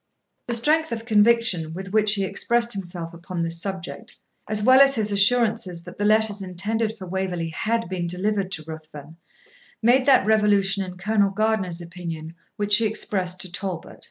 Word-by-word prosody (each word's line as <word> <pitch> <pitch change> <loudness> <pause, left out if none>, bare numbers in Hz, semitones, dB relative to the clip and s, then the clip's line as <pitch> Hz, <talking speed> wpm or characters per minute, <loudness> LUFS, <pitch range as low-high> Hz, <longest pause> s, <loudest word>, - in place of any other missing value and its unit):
The 240 - -1
strength 310 +7 +2
of 230 0 -4
conviction 215 -7 +2
with 190 0 -7
which 215 -1 +3
he 200 - -1
expressed 235 +4 0
himself 175 -3 -5
upon 170 0 -5
this 165 0 -2
subject, 195 +4 -6 0.3
as 210 -1 -1
well 260 +3 +7
as 275 0 +5
his 215 -2 -1
assurances 205 -3 +2
that - - -12
the 205 - 0
letters 215 -1 +2
intended 215 +4 -2
for 190 - -8
Waverley 180 -2 -3
had 225 +6 -1
been 175 -1 -3
delivered 190 +2 -1
to 155 - -5
Ruthven, 155 -1 -10 0.6
made 250 +4 +3
that 260 -7 +5
revolution 205 -2 +3
in 180 -1 -8
Colonel 200 +1 +1
Gardiner's 195 -4 -1
opinion 170 -2 -7 0.2
which 205 -1 +2
he 225 0 +2
expressed 190 -4 -2
to 185 - -4
Talbot. 180 -2 -6
200 Hz, 170 wpm, -23 LUFS, 180-220 Hz, 0.6 s, well